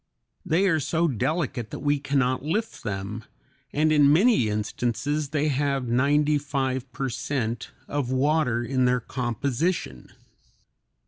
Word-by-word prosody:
They 180 Hz, +1 st, +2 dB
are 160 Hz, -4 st, +3 dB
so 165 Hz, +4 st, +1 dB
delicate 130 Hz, -3 st, -1 dB
that -, -, -6 dB
we 145 Hz, 0 st, +1 dB
can 140 Hz, 0 st, -1 dB
not 130 Hz, -1 st, +1 dB
lift 210 Hz, +9 st, -2 dB
them, 105 Hz, +2 st, -4 dB, 0.5 s
and 155 Hz, +1 st, +2 dB
in 145 Hz, -2 st, +5 dB
many 180 Hz, -, +4 dB
instances 120 Hz, +7 st, -2 dB
they 150 Hz, 0 st, 0 dB
have 140 Hz, -2 st, 0 dB
ninety 145 Hz, +5 st, +2 dB
five 135 Hz, -2 st, -2 dB
per 135 Hz, +2 st, -3 dB
cent 120 Hz, -2 st, -3 dB, 0.2 s
of 145 Hz, -4 st, -2 dB
water 130 Hz, -2 st, +1 dB
in 130 Hz, +1 st, +1 dB
their 125 Hz, 0 st, +3 dB
composition. 125 Hz, -, -2 dB
140 Hz, 135 wpm, -25 LUFS, 125-150 Hz, 0.5 s, in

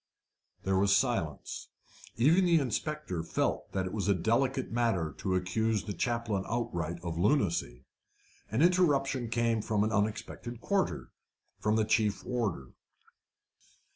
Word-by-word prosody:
There 95 Hz, 0 st, +2 dB
was 100 Hz, 0 st, +4 dB
silence. 100 Hz, -, -2 dB, 0.5 s
Even 155 Hz, +11 st, +5 dB
the 170 Hz, -2 st, +5 dB
inspector 140 Hz, -, -2 dB
felt 80 Hz, -, -1 dB
that 95 Hz, -1 st, 0 dB
it 95 Hz, -, -5 dB
was 100 Hz, -3 st, -2 dB
a 100 Hz, -, +4 dB
delicate 130 Hz, -, 0 dB
matter 115 Hz, -9 st, 0 dB
to 95 Hz, -1 st, 0 dB
accuse 105 Hz, +4 st, 0 dB
the 105 Hz, -, -4 dB
chaplain 115 Hz, -5 st, -1 dB
outright 85 Hz, -8 st, -2 dB
of 85 Hz, -1 st, -3 dB
lunacy. 85 Hz, -, +1 dB, 0.6 s
An 115 Hz, +8 st, +2 dB
interruption 140 Hz, -9 st, +2 dB
came 115 Hz, -1 st, +1 dB
from 105 Hz, -1 st, +1 dB
an 110 Hz, -, 0 dB
unexpected 110 Hz, +3 st, -2 dB
quarter 195 Hz, +7 st, -1 dB, 0.5 s
from 105 Hz, +1 st, +1 dB
the 110 Hz, -1 st, +2 dB
chief 105 Hz, -2 st, +1 dB
warder. 105 Hz, -, -2 dB
110 Hz, 135 wpm, -30 LUFS, 95-125 Hz, 0.6 s, Even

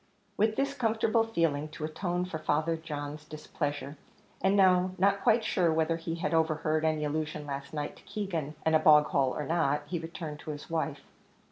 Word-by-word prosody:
With 215 Hz, +2 st, +2 dB
this 275 Hz, +2 st, 0 dB
comfortable 225 Hz, -3 st, +2 dB
feeling, 165 Hz, -9 st, 0 dB
to 155 Hz, -, -4 dB
atone 175 Hz, +3 st, -2 dB
for 170 Hz, -3 st, -5 dB
Father 155 Hz, +1 st, +1 dB
John's 150 Hz, -2 st, -6 dB
displeasure, 150 Hz, -1 st, -4 dB, 0.4 s
and 195 Hz, +1 st, +3 dB
now 185 Hz, -2 st, +4 dB
not 200 Hz, +1 st, +3 dB
quite 225 Hz, +1 st, +4 dB
sure 175 Hz, -6 st, +2 dB
whether 160 Hz, +1 st, +1 dB
he 165 Hz, 0 st, -4 dB
had 170 Hz, 0 st, -2 dB
overheard 155 Hz, -1 st, +1 dB
any 155 Hz, -1 st, +1 dB
allusion 150 Hz, 0 st, -3 dB
last 140 Hz, -1 st, -5 dB
night 150 Hz, -1 st, -4 dB
to -, -, -18 dB
Keegan 185 Hz, -7 st, -3 dB
and 160 Hz, -, +3 dB
a -, -, +6 dB
bog 150 Hz, -1 st, +7 dB
hole 135 Hz, -3 st, +1 dB
or 150 Hz, -, -2 dB
not, 150 Hz, -2 st, +1 dB
he 170 Hz, +3 st, -3 dB
returned 165 Hz, -2 st, -6 dB
to -, -, -9 dB
his 150 Hz, +1 st, -7 dB
wife. 155 Hz, -3 st, -2 dB
160 Hz, 190 wpm, -30 LUFS, 150-185 Hz, 0.4 s, bog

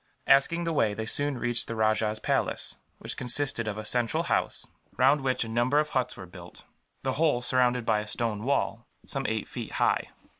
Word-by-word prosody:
Asking 140 Hz, +5 st, +4 dB
the 165 Hz, -1 st, -1 dB
way, 110 Hz, -8 st, +1 dB
they 110 Hz, -, -4 dB
soon 145 Hz, +3 st, 0 dB
reached 120 Hz, 0 st, 0 dB
the 115 Hz, -, -4 dB
rajah's 110 Hz, 0 st, +1 dB
palace, -, -, -1 dB, 0.2 s
which -, -, -4 dB
consisted 125 Hz, -2 st, +1 dB
of 105 Hz, 0 st, -3 dB
a 110 Hz, -, -6 dB
central 120 Hz, +1 st, +1 dB
house, -, -, -1 dB, 0.3 s
round 135 Hz, +3 st, +4 dB
which 130 Hz, -2 st, 0 dB
a -, -, -7 dB
number 120 Hz, +5 st, +1 dB
of 150 Hz, 0 st, +2 dB
huts 130 Hz, -3 st, -1 dB
were 95 Hz, -, -8 dB
built; 90 Hz, -1 st, -13 dB, 0.4 s
the -, -, 0 dB
whole 150 Hz, -7 st, +3 dB
surrounded 125 Hz, -1 st, +2 dB
by 110 Hz, -2 st, +2 dB
a 105 Hz, -, -6 dB
stone 110 Hz, -1 st, -2 dB
wall, 125 Hz, -3 st, -1 dB, 0.2 s
some 135 Hz, -1 st, -3 dB
eight 110 Hz, -2 st, -2 dB
feet -, -, -7 dB
high. -, -, +1 dB
120 Hz, 195 wpm, -28 LUFS, 110-135 Hz, 0.4 s, Asking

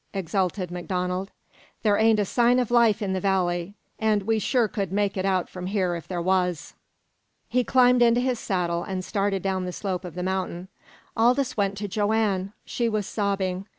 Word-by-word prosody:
exulted 185 Hz, 0 st, -1 dB
MacDonald. 180 Hz, +1 st, -3 dB, 0.5 s
"There 210 Hz, -2 st, +4 dB
ain't 220 Hz, +1 st, +4 dB
a 205 Hz, -, +2 dB
sign 240 Hz, +4 st, +3 dB
of 245 Hz, -2 st, 0 dB
life 230 Hz, -3 st, +4 dB
in 190 Hz, -2 st, -1 dB
the 190 Hz, -, -1 dB
valley, 180 Hz, -1 st, 0 dB, 0.2 s
and 215 Hz, -2 st, +2 dB
we 220 Hz, +2 st, +1 dB
sure 235 Hz, +3 st, +2 dB
could 195 Hz, -3 st, -3 dB
make 200 Hz, 0 st, 0 dB
it 190 Hz, -1 st, -2 dB
out 185 Hz, -2 st, +1 dB
from 180 Hz, 0 st, -7 dB
here 190 Hz, -3 st, 0 dB
if 170 Hz, -, -8 dB
there 180 Hz, -2 st, -3 dB
was!" 180 Hz, -4 st, 0 dB, 0.7 s
He 250 Hz, 0 st, +1 dB
climbed 250 Hz, -1 st, +4 dB
into 235 Hz, 0 st, +5 dB
his 250 Hz, -1 st, 0 dB
saddle, 175 Hz, -4 st, -1 dB
and 185 Hz, -1 st, -4 dB
started 195 Hz, -2 st, -1 dB
down 190 Hz, -1 st, -1 dB
the 180 Hz, -, -3 dB
slope 185 Hz, -1 st, -3 dB
of 180 Hz, -2 st, -8 dB
the 180 Hz, -, -3 dB
mountain. 185 Hz, -1 st, -3 dB, 0.5 s
Aldous 250 Hz, +3 st, +2 dB
went 200 Hz, -1 st, 0 dB
to 205 Hz, +1 st, -3 dB
Joanne. 205 Hz, -2 st, 0 dB
She 235 Hz, -1 st, -1 dB
was 215 Hz, -2 st, -1 dB
sobbing. 195 Hz, -2 st, -2 dB
195 Hz, 185 wpm, -25 LUFS, 185-220 Hz, 0.7 s, into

